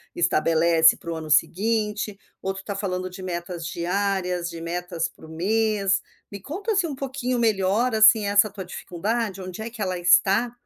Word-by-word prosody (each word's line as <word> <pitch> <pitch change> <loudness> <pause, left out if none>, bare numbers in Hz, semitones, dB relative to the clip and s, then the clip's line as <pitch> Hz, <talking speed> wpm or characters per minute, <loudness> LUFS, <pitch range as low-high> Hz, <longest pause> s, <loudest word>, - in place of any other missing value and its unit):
estabelece 165 -1 +4
para 170 - -7
o - - -3
ano 160 -1 -7
seguinte? 210 +3 +1 0.2
Ou 195 - -2
tu 190 0 -9
tá 200 - -4
falando 185 -2 -3
de 185 +1 -10
metas 175 -1 -5
diárias? 180 0 -1
De 165 -1 -8
metas 170 0 -3
para - - -16
o - - -13
mês? 195 +3 +1 0.3
Me 200 - -7
conta 390 - -4
assim 390 -4 +2
um 290 - -5
pouquinho 260 -2 -3
melhor 220 +2 +1
assim 220 0 +6
essa 205 +1 +4
tua 195 -1 -7
dificuldade, 195 +3 -3
onde 185 +2 -7
é 225 - -5
que 230 -1 -10
ela 185 -2 -1
está. 195 +6 +4
195 Hz, 180 wpm, -24 LUFS, 175-220 Hz, 0.3 s, assim